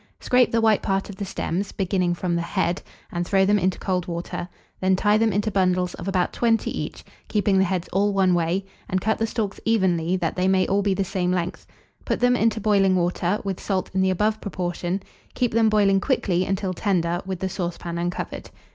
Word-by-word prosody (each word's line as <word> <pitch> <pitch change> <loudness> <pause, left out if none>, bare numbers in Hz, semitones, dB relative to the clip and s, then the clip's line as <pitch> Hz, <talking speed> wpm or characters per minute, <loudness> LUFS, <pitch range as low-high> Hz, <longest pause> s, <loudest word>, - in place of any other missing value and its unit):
Scrape 250 -1 +3
the 230 - +2
white 220 -2 +4
part 195 +1 -1
of 195 - -12
the 200 - -3
stems, 190 +1 -3
beginning 185 -2 0
from 175 0 -1
the 170 - 0
head, 175 +1 -1 0.3
and 175 0 -1
throw 190 +2 +3
them 205 +1 +3
into 185 0 0
cold 185 -2 -2
water; 175 +1 -4 0.3
then 190 0 +3
tie 205 +2 +3
them 225 0 +3
into 205 +2 0
bundles 180 -2 +1
of 175 - -7
about 185 -2 0
20 230 -2 +1
each, - - -5 0.2
keeping 205 -2 +2
the - - +5
heads 180 -1 -2
all 200 +2 +2
one 190 -2 +3
way, 175 +3 0 0.2
and 185 - +1
cut 220 +4 0
the 225 - +1
stalks 210 -3 -3
evenly, 185 -6 +2
that 170 -3 -1
they 185 0 +1
may 190 -1 +3
all 200 +1 +1
be 200 -1 +1
the 195 - 0
same 180 -1 -1
length; 180 0 -3 0.4
put - - -1
them 245 0 +4
into 225 -2 +1
boiling 195 -3 +3
water, 180 +2 0
with 195 -3 -3
salt 190 -3 -2
in 190 - +1
the 190 - +3
above 210 +4 0
proportion; 180 0 -3 0.3
keep 245 -3 0
them 225 -1 +4
boiling 200 -2 +4
quickly 185 -9 +1
until 190 -1 -1
tender, 175 -2 0
with 190 -1 -2
the 190 - -1
saucepan 175 -2 -4
uncovered. 175 +1 -4
190 Hz, 210 wpm, -24 LUFS, 180-205 Hz, 0.4 s, the